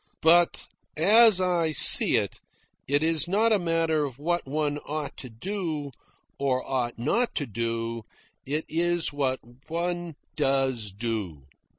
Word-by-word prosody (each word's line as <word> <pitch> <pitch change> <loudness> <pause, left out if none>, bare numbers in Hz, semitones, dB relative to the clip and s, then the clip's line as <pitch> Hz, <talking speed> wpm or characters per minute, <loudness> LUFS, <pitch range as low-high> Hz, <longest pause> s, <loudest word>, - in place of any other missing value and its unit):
But, 170 +2 +4 0.3
as 215 +4 +6
I 175 -3 +1
see - - +6
it, - - -2 0.5
it 145 +3 +1
is 160 -1 +3
not 215 +5 +2
a 210 - +2
matter 165 -3 0
of 135 -4 -6
what 175 +2 -2
one 145 +1 -2
ought 150 0 -6
to 125 - -8
do, 155 - -5 0.5
or 130 -2 -1
ought 125 -3 -2
not 230 - -1
to 145 - -1
do. 115 0 -4 0.4
It 150 +4 -3
is 170 0 0
what 135 -2 -1 0.3
one 175 0 -4 0.2
DOES 135 -7 0
do. 100 - -4
150 Hz, 135 wpm, -26 LUFS, 130-175 Hz, 0.5 s, as